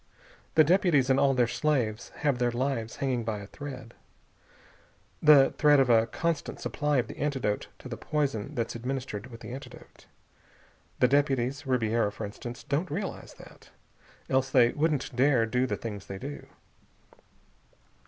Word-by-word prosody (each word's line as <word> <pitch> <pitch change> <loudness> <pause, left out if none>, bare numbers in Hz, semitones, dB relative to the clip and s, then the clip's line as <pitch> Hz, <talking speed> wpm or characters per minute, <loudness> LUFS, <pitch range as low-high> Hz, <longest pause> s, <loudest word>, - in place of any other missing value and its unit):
"The 155 - +7
deputies 155 -6 +3
and 130 - +3
all 135 -1 +3
their 125 -1 +4
slaves 120 -3 -1 0.2
have 140 -4 +2
their 120 0 +2
lives 120 -2 -2
hanging 130 -4 -1
by 110 -1 -2
a 100 - -8
thread 130 0 -9 1.3
the 145 -3 +7
thread 150 -1 +6
of 130 -2 +4
a 115 0 +4
constant 165 +3 -2
supply 150 -1 -1
of 125 - +2
the - - -9
antidote 135 -8 -1
to - - -11
the - - -6
poison 140 -8 -2
that's 115 -1 -2
administered 125 -2 -4
with 115 -2 -12
the - - -7
antidote. 130 -1 -12 0.9
The 125 - +6
deputies 140 0 +1
Ribiera, 115 -4 +1
for 105 - -6
instance 120 +4 -8
don't 155 +6 -1
realize 190 +5 -5
that. - - -16 0.6
Else 130 0 +1
they 125 -3 +5
wouldn't 145 -3 -1
dare 130 -2 +3
do 125 +3 0
the - - -2
things 105 -4 -7
they 95 - -6
do. 140 +8 -8
130 Hz, 155 wpm, -28 LUFS, 115-145 Hz, 1.3 s, The